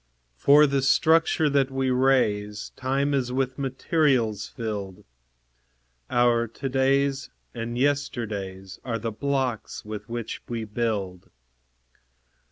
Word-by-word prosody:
For 145 Hz, -, +6 dB
the 140 Hz, -1 st, +1 dB
structure 160 Hz, +3 st, +3 dB
that 140 Hz, -2 st, +2 dB
we 135 Hz, -1 st, -1 dB
raise, 110 Hz, -6 st, +1 dB
Time 135 Hz, +2 st, 0 dB
is 130 Hz, -3 st, 0 dB
with 130 Hz, +1 st, -1 dB
materials 130 Hz, -, +1 dB
filled; 100 Hz, -5 st, -5 dB, 1.1 s
Our 120 Hz, -1 st, +3 dB
to 130 Hz, +5 st, -6 dB
days 135 Hz, +1 st, +1 dB, 0.2 s
and 120 Hz, 0 st, -4 dB
yesterdays 105 Hz, -9 st, -2 dB
Are 115 Hz, -3 st, -2 dB
the 115 Hz, +1 st, -3 dB
blocks 130 Hz, -2 st, -2 dB
with 105 Hz, 0 st, -7 dB
which 115 Hz, -1 st, -5 dB
we 115 Hz, -2 st, -3 dB
build. 105 Hz, -5 st, -3 dB
125 Hz, 110 wpm, -25 LUFS, 110-135 Hz, 1.1 s, For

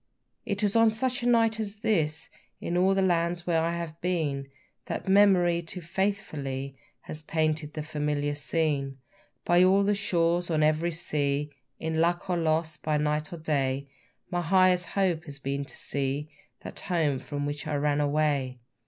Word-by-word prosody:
It 205 Hz, +1 st, -1 dB
is 205 Hz, 0 st, +2 dB
of 225 Hz, -1 st, +6 dB
such 255 Hz, +3 st, -1 dB
a 240 Hz, -, -1 dB
night 225 Hz, -2 st, +3 dB
as 210 Hz, -1 st, -5 dB
this, 160 Hz, -9 st, 0 dB, 0.3 s
In 175 Hz, -, -3 dB
all 190 Hz, +2 st, +3 dB
the 195 Hz, -, +2 dB
lands 170 Hz, -1 st, +1 dB
where 165 Hz, -2 st, +2 dB
I 170 Hz, +1 st, -1 dB
have 170 Hz, -1 st, -6 dB
been, 155 Hz, -6 st, -1 dB, 0.4 s
That -, -, -4 dB
memory 190 Hz, -3 st, +5 dB
too 170 Hz, +2 st, -7 dB
faithfully 155 Hz, -8 st, -3 dB, 0.3 s
Has 155 Hz, -, -6 dB
painted 155 Hz, -1 st, -1 dB
the 155 Hz, -, -3 dB
familiar 150 Hz, -1 st, -1 dB
scene. 145 Hz, -2 st, -1 dB, 0.5 s
By 175 Hz, +1 st, +5 dB
all 195 Hz, +2 st, +5 dB
the 205 Hz, +1 st, +2 dB
shores, 175 Hz, -3 st, +1 dB
on 155 Hz, -2 st, +2 dB
every 155 Hz, +3 st, +2 dB
sea, 150 Hz, -3 st, -1 dB, 0.3 s
In 160 Hz, 0 st, -1 dB
luck 175 Hz, +2 st, +1 dB
or 175 Hz, -, +1 dB
loss, 160 Hz, -1 st, 0 dB
by 155 Hz, -1 st, -1 dB
night 150 Hz, 0 st, -1 dB
or 170 Hz, -, -6 dB
day, 140 Hz, -3 st, -1 dB, 0.4 s
My 175 Hz, -1 st, 0 dB
highest 180 Hz, 0 st, +3 dB
hope 180 Hz, -5 st, 0 dB
has 145 Hz, -3 st, -6 dB
been 140 Hz, +1 st, -3 dB
to -, -, -9 dB
see 140 Hz, +2 st, -3 dB, 0.3 s
That -, -, -7 dB
home 160 Hz, -8 st, 0 dB
from 145 Hz, +1 st, -4 dB
which 145 Hz, +2 st, -4 dB
I 150 Hz, -, -1 dB
ran 145 Hz, 0 st, +1 dB
away. 145 Hz, -3 st, 0 dB
160 Hz, 170 wpm, -28 LUFS, 150-180 Hz, 0.5 s, of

